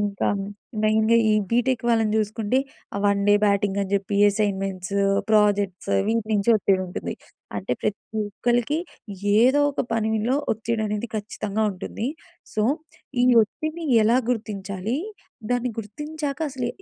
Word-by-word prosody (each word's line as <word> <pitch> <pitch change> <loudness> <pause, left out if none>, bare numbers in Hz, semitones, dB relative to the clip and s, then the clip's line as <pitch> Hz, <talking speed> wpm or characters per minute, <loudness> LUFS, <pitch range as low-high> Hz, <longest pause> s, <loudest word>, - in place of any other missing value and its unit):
ఇంక 205 -1 -2 0.6
మెయిన్‌గా 220 +1 +4
ఈ - - +4 0.2
బీటెక్ 245 +1 +1
వాళ్ళని 225 -2 +2
చూసుకుంటే 215 +3 0 0.4
ఆ - - -1
వన్ 200 0 +2
డే 205 - +7
బ్యాటింగ్ 200 -1 +2
అని 195 0 -5
చెప్పి 200 0 -1
అసైన్‌మెంట్సు, 195 -2 -1 0.3
ప్రాజెక్ట్సు 205 -3 +2
వీటి 225 0 0
నుంచి 205 +2 +2
ఒత్తిడి 195 -2 +2
ఉంటుంది. 180 - -5 0.4
అంటే 100 +4 -2
ప్రతి 210 - -1 0.3
ఒక్కలికి 240 +7 0 0.5
యేదో 240 +8 +5
ఒక - - -2
పనిలో 220 +2 +1 0.2
ఒత్తిడి 225 +1 -2
అనేది 210 +3 -3
ఖచ్చితంగా 210 0 -2
ఉంటుంది. 195 +4 -5 0.5
సో, 215 - +1 0.6
ఈ - - +4 0.2
ఒత్తిడిని 310 +9 -4 0.2
ఎలా 235 +4 +4
గుర్తించాలి? 210 -1 -3 0.5
దాన్ని 245 0 +1
గుర్తించాక 295 +7 -5
అసలు 255 -2 -3
215 Hz, 130 wpm, -24 LUFS, 200-235 Hz, 0.6 s, డే